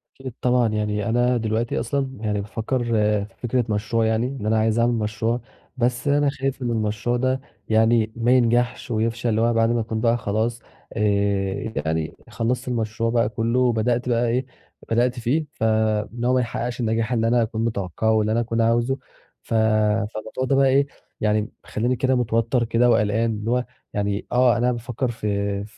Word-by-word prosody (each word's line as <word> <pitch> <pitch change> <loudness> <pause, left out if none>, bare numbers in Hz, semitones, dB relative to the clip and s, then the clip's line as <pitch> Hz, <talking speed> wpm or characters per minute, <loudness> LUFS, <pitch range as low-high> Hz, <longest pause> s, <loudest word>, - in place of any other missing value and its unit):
أكيد 130 -3 -8
طبعًا 125 -1 +3
يعني 105 -1 -1
أنا 120 +2 +2
دلوقتي 110 +1 -1
أصلًا 135 +3 -1
يعني 105 -2 -1
بافكر 115 +4 -2
في 105 -3 +1
فكرة 125 0 0
مشروع 110 +2 0
يعني 110 +2 +1
إن 130 -5 -6
أنا 110 +1 +2
عايز 110 +1 +2
أعمل 120 +1 +3
مشروع، 110 +2 -1 0.4
بس 120 +2 0
أنا 145 0 +3
خايف 135 -1 -3
إن 120 - -1
المشروع 110 +2 -1
ده 130 +1 0 0.3
يعني 110 0 +3
ما 120 +1 +1
ينجحش 120 0 +2
ويفشل 115 +2 0
اللي 110 0 +1
هو 120 0 +3
بعد 115 0 +3
ما 120 - +1
أكون 110 0 -3
بقى 120 0 +3
خلاص 110 +2 -1 0.3
آآ 100 0 0
يعني 80 0 -2
خلصت 120 +2 -2
المشروع 115 -1 -1
بقى 115 -2 +2
كله 120 +2 +1
بدأت 120 +2 0
بقى 120 0 +2
إيه 125 +3 0 0.5
بدأت 120 +2 +2
فيه، 140 +7 0
فإن 110 +1 0
هو 125 - +3
ما 130 - +3
يحققش 120 +1 -3
النجاح 115 0 0
اللي 115 -1 +1
أنا 120 0 +3
أكون 110 0 -1
متوقعه 110 +1 0
اللي 105 0 0
أنا 115 - +2
أكون 115 0 0
عاوزه 120 +4 +2 0.5
ف - - -6
فالموضوع 110 +2 +1
ده 135 +1 +2
بقى 135 0 +4
إيه 140 +2 +3 0.3
يعني 105 0 +1
مخليني 120 +4 -1
كده 130 +2 +1
متوتر 120 0 +1
كده 120 +2 +3
وقلقان، 110 0 +2
اللي 110 +1 -3
هو 125 0 +1 0.3
يعني 100 0 -1
آه 125 -1 +4
أنا 125 +1 +2
بافكر 120 +1 -3
في 100 -2 -2
115 Hz, 175 wpm, -23 LUFS, 110-120 Hz, 0.5 s, بقى